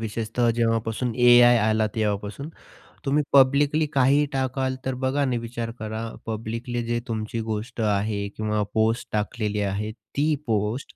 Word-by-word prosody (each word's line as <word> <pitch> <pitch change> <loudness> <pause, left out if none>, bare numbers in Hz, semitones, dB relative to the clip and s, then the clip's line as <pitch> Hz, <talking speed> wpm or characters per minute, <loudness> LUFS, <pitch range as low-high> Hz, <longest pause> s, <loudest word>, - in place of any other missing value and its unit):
विशेषतः 115 +2 -1
जेव्हापासून 115 +1 0
ए 120 0 +7
आय 120 0 +6
आला 110 0 +2
तेव्हापासून. 105 +4 -2 0.6
तुम्ही 145 +2 +2
पब्लिकली 140 +3 +4
काहीही 140 +2 +4
टाकाल, 130 0 -1
तर 130 - -1
बघा, 135 +2 +1
आणि 130 -3 +1
विचार 115 0 -5
करा. 110 +1 -4 0.2
पब्लिकली 115 +2 -4
जे 120 0 -1
तुमची 110 0 -3
गोष्ट 110 +3 -4
आहे 105 -1 0
किंवा 105 -1 -1
पोस्ट 110 +2 +1
टाकलेली 105 0 -2
आहे, 100 +2 -2
ती 130 +8 -2
पोस्ट 110 +3 -2
115 Hz, 140 wpm, -24 LUFS, 110-130 Hz, 0.6 s, ए